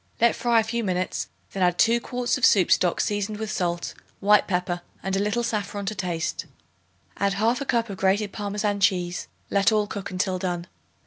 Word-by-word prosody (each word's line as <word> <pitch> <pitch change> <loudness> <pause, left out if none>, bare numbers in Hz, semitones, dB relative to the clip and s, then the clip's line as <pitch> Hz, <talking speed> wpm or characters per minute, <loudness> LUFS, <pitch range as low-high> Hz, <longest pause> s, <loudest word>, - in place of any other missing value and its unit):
Let 235 0 +4
fry 235 -1 +3
a - - +2
few 230 +1 -2
minutes; 185 -2 -1 0.3
then 195 - -3
add 180 -1 +3
2 230 +1 +4
quarts 250 0 -1
of 265 - -5
soup 190 -8 +5
stock 175 -2 +3
seasoned 205 0 -1
with 220 0 -4
salt, 175 -3 -2 0.3
white 210 0 +4
pepper 180 -1 -1 0.2
and 195 0 -1
a - - +1
little 210 +4 0
saffron 205 -3 -2
to 195 - -1
taste. 180 -4 -3 0.7
Add 200 0 +1
1/2 230 +7 0
cup 235 -1 +1
of 195 - -6
grated 195 +2 +1
Parmesan 205 0 -2
cheese; 180 -2 +1 0.2
let 200 +1 +4
all 215 -1 +2
cook 200 -1 -6
until 185 0 -1
done. 175 -2 -2
200 Hz, 190 wpm, -25 LUFS, 185-220 Hz, 0.7 s, soup